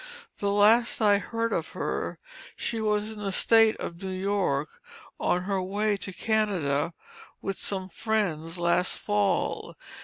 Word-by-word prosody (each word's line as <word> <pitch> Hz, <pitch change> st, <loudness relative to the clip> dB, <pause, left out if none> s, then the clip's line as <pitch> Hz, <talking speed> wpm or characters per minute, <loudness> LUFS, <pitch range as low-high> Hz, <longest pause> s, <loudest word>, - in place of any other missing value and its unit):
The 200 Hz, -, 0 dB
last 215 Hz, +4 st, +4 dB
I 205 Hz, -2 st, +4 dB
heard 230 Hz, +2 st, -2 dB
of -, -, -2 dB
her, -, -, -3 dB, 0.4 s
she 225 Hz, -1 st, -2 dB
was 210 Hz, 0 st, 0 dB
in 215 Hz, -, -8 dB
the 200 Hz, -2 st, -2 dB
State 225 Hz, +3 st, +5 dB
of 170 Hz, +2 st, -6 dB
New 190 Hz, -, -4 dB
York, 185 Hz, -6 st, 0 dB, 0.5 s
on 180 Hz, 0 st, +1 dB
her 195 Hz, 0 st, -1 dB
way 205 Hz, +3 st, 0 dB
to 195 Hz, 0 st, -6 dB
Canada 180 Hz, -7 st, 0 dB, 0.4 s
with 195 Hz, -1 st, -4 dB
some 190 Hz, -2 st, -1 dB
friends, 180 Hz, -6 st, -1 dB
last 175 Hz, +1 st, +1 dB
fall. 205 Hz, -2 st, 0 dB
200 Hz, 145 wpm, -27 LUFS, 180-215 Hz, 0.5 s, State